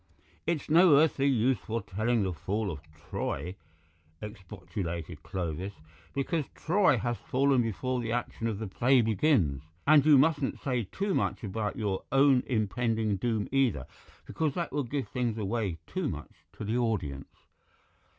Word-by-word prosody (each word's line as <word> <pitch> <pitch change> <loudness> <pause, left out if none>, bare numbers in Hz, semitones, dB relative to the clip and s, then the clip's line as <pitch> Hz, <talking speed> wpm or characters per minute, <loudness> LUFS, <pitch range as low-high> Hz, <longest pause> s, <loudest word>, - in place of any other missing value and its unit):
"It's 165 -3 -1
no 165 0 +6
earthly 145 -2 +3
use 125 -2 +2
foretelling 110 +1 -1
the 95 -2 -1
fall 100 +4 -2
of 75 - -6
Troy," 80 +2 -4 0.6
expostulated 90 -5 -6
Clovis, 90 +2 -4 0.4
"because 145 +2 0
Troy 175 -5 +3
has 120 +1 -1
fallen 135 0 +2
before 125 +3 -2
the 115 -1 -3
action 120 -1 -2
of 110 -3 -2
the 110 - -4
play 125 +6 +3
begins. 110 - +2 0.2
And 150 -1 +6
you 150 -1 +7
mustn't 145 -1 +2
say 125 -5 -1
too 200 0 -1
much - - -1
about 105 +1 -2
your 100 -3 -2
own 135 -1 +5
impending 110 -2 0
doom 110 0 -1
either, 130 - +1 0.4
because 155 -4 -1
that 170 -1 -2
will 145 - 0
give 135 +2 -3
things 120 -3 -2
away 105 -4 -1
too - - -2
much - - -7 0.2
to - - -7
the 110 +4 0
audience." 90 - -2
115 Hz, 150 wpm, -29 LUFS, 100-135 Hz, 0.6 s, you